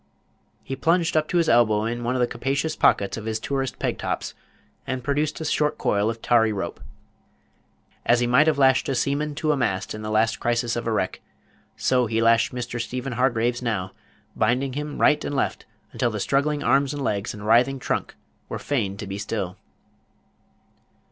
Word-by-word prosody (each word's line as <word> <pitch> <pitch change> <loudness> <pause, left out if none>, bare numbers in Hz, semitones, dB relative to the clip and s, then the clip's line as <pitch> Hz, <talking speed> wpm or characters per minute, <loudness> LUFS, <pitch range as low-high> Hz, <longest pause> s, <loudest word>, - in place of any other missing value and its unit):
He 135 - -4
plunged 165 +5 +1
up 155 0 +2
to 175 - 0
his 170 - +2
elbow 110 -3 +4
in 120 +1 -3
one 125 +2 -1
of 125 - 0
the - - +5
capacious 140 +6 -2
pockets 100 +2 +2
of 110 - -7
his 110 0 -2
tourist 135 +1 -2
peg - - -2
tops, - - -3 0.5
and 130 -1 -3
produced 145 +3 -1
a 160 - -4
short 150 0 +1
coil 105 +2 +1
of 115 0 -5
tarry 115 -2 +4
rope. 100 -2 -4 1.2
As 120 0 +3
he 120 - +2
might 125 +6 +4
have 155 -2 +3
lashed 135 -1 +3
a 135 - 0
seaman 145 +4 -1
to 155 +1 0
a - - +2
mast 95 -8 -1
in 110 - -7
the 110 - -5
last 110 +1 +1
crisis 120 0 0
of 120 0 -3
a - - +1
wreck, 100 -4 -1 0.6
so 125 -2 +2
he 110 +1 0
lashed 115 0 +4
Mr. 120 -1 -4
Stephen 125 +2 -4
Hargraves 120 -1 +1
now, 100 -6 -2 0.4
binding 125 +4 +1
him 150 +1 -5
right 150 0 +4
and 145 - -3
left, 135 - -2 0.2
until 120 - 0
the 105 -2 -4
struggling 145 +6 0
arms 135 +3 +2
and 145 - -4
legs, 100 -4 -2
and 105 0 -9
writhing 120 +5 +4
trunk, 130 - -3 0.3
were - - -3
fain 105 -9 -2
to 105 - -6
be 100 +1 -5
still. 95 -4 -3
120 Hz, 195 wpm, -24 LUFS, 110-140 Hz, 1.2 s, the